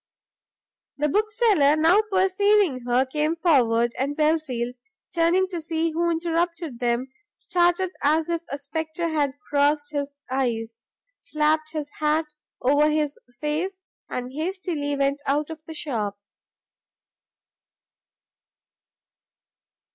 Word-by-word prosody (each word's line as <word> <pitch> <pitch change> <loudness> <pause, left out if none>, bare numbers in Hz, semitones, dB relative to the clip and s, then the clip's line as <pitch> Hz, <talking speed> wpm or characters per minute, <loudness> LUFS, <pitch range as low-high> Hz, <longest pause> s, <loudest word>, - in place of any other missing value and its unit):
The 300 +1 +1
bookseller 415 - +3
now 330 +7 +5
perceiving 380 -4 +3
her, 250 +2 +3
came 300 +4 0
forward, 240 -9 +3
and 280 +2 -1
Belfield, 300 -6 0 0.4
turning 350 +2 +3
to 345 -3 -4
see 325 0 -1
who 340 +2 0
interrupted 335 -4 -1
them, 245 +1 0 0.3
started 350 0 +1
as 310 +2 +2
if 335 -1 -1
a 280 - -3
spectre 315 +3 -3
had 290 -4 0
crossed 290 +1 +2
his 285 -1 -3
eyes, 230 -3 -2 0.4
slapped 310 +1 0
his 295 -2 -4
hat 305 0 +1 0.3
over 290 +4 +4
his 300 -1 -1 0.2
face, 335 +6 -2 0.3
and 250 0 -4
hastily 320 -3 -2
went 280 +1 0
out 290 +3 0
of 320 -1 -8
the 320 - -7
shop. 220 -10 -2
305 Hz, 110 wpm, -24 LUFS, 280-335 Hz, 0.4 s, now